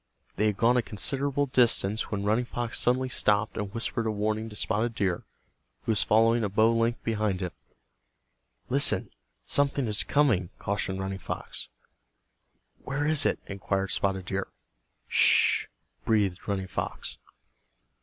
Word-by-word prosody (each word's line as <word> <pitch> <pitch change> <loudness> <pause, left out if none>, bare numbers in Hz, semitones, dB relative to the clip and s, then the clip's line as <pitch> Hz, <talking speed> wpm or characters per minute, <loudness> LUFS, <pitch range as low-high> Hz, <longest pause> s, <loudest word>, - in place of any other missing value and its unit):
They 105 - +2
had 105 -2 -1
gone 120 +2 +3
a - - +3
considerable 140 +6 -1
distance 115 -5 +2
when 100 -1 -3
Running 110 +4 +1
Fox 120 -1 -3
suddenly 130 +1 +2
stopped 105 -3 +1
and 100 -2 -4
whispered 115 0 -2
a - - +1
warning 110 +1 -2
to 105 - -11
Spotted 110 +3 -1
Deer, 95 -5 -1 0.6
who - - 0
was 105 - +3
following 115 +1 +3
a 105 - 0
bow 110 +3 +3
length 115 +1 0
behind 110 -4 -1
him. 90 -2 -3 1.2
"Listen, - - +4 0.3
something 140 -1 +1
is 105 -2 0
coming," 115 -12 +2
cautioned 95 -1 -2
Running 95 0 -4
Fox. - - -6 1.1
"Where 145 +2 -3
is 155 -1 +4
it?" - - 0
inquired 95 0 -2
Spotted 95 -1 0
Deer. 95 +1 -3 0.6
"Sh," - - +4 0.4
breathed 100 -5 0
Running 100 -2 -1
Fox. - - -5
110 Hz, 145 wpm, -27 LUFS, 100-120 Hz, 1.2 s, Listen